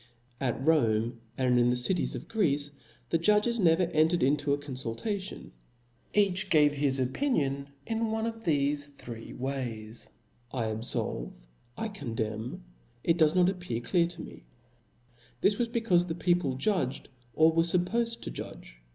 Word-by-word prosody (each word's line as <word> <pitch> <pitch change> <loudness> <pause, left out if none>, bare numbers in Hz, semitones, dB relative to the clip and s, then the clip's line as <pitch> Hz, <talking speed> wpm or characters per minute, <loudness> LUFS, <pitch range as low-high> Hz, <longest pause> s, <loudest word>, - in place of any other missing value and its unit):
At 125 -4 -1
Rome, 115 -7 +2 0.2
and 125 -2 +3
in 120 0 +4
thecitieS; 125 +9 +1
of - - -7
Greece, 145 -9 +1 0.4
the 165 - +3
judges 210 +6 +3
never 170 -1 +4
entered 165 0 +2
into 145 +2 +2
a 140 - +3
conful 130 -5 -4
tation; 200 -3 -4 0.6
each 195 -2 +2
gave 150 -4 +5
his 140 -2 +1
opinion 140 - 0 0.2
one 225 0 -1
of 225 -1 -4
thefe 145 -4 0
three 115 -2 -8
ways, 120 -4 -5 0.4
labfolve^ 110 - -2 0.4
I 225 - -2
condemn^ 115 - -4 0.4
it 165 - +3
does 155 +1 +4
not 180 -1 +5
appear 180 -11 -2
cUar 170 +7 +2
t'd 175 - -8
me 165 - -10 0.5
*: 120 0 -31
this 205 0 +3
was 235 -1 +1
becaufe 225 -7 +2
the 160 - -3
people 175 -6 +1
judged, 140 -4 -1 0.3
or 160 +1 +6
were 165 +1 +3
fuppofed 195 +8 +1
to - - -5
judge. - - -9
150 Hz, 145 wpm, -29 LUFS, 125-185 Hz, 0.6 s, or